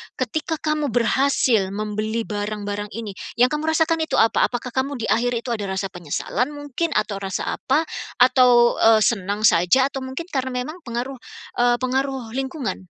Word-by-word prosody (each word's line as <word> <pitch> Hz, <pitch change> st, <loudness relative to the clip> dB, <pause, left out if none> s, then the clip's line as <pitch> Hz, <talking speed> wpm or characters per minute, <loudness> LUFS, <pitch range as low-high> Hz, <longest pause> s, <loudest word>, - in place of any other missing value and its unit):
ketika 315 Hz, 0 st, -2 dB
kamu 305 Hz, -1 st, 0 dB
berhasil 240 Hz, -3 st, +2 dB
membeli 215 Hz, +2 st, -2 dB
barang-barang 205 Hz, -1 st, -4 dB
ini, 225 Hz, -2 st, -5 dB, 0.2 s
yang 250 Hz, +1 st, +4 dB
kamu 300 Hz, +1 st, -2 dB
rasakan 320 Hz, +1 st, +2 dB
itu 320 Hz, -, -1 dB
apa? 225 Hz, -, +4 dB
Apakah 245 Hz, 0 st, -5 dB
kamu 265 Hz, +3 st, -1 dB
di 230 Hz, -4 st, -2 dB
akhir 245 Hz, +2 st, +1 dB
itu 235 Hz, +1 st, -3 dB
ada 210 Hz, -4 st, -2 dB
rasa 190 Hz, -1 st, -3 dB
penyesalan 195 Hz, -, -3 dB
mungkin? 290 Hz, +2 st, -3 dB
Atau 210 Hz, -2 st, 0 dB
rasa 195 Hz, -1 st, -3 dB
apa? 290 Hz, +5 st, +1 dB, 0.3 s
Atau, 250 Hz, -1 st, +5 dB
eee, 225 Hz, -1 st, +5 dB
senang 200 Hz, -1 st, 0 dB
saja? 215 Hz, +8 st, +4 dB
Atau 270 Hz, -1 st, -6 dB
mungkin 265 Hz, +7 st, -6 dB
karena 260 Hz, -4 st, -2 dB
memang 310 Hz, +7 st, -7 dB
pengaruh, 245 Hz, +2 st, -4 dB, 0.4 s
eee, 245 Hz, 0 st, +4 dB
pengaruh 265 Hz, -1 st, -1 dB
lingkungan? 265 Hz, -, -4 dB
245 Hz, 160 wpm, -22 LUFS, 215-270 Hz, 0.4 s, Atau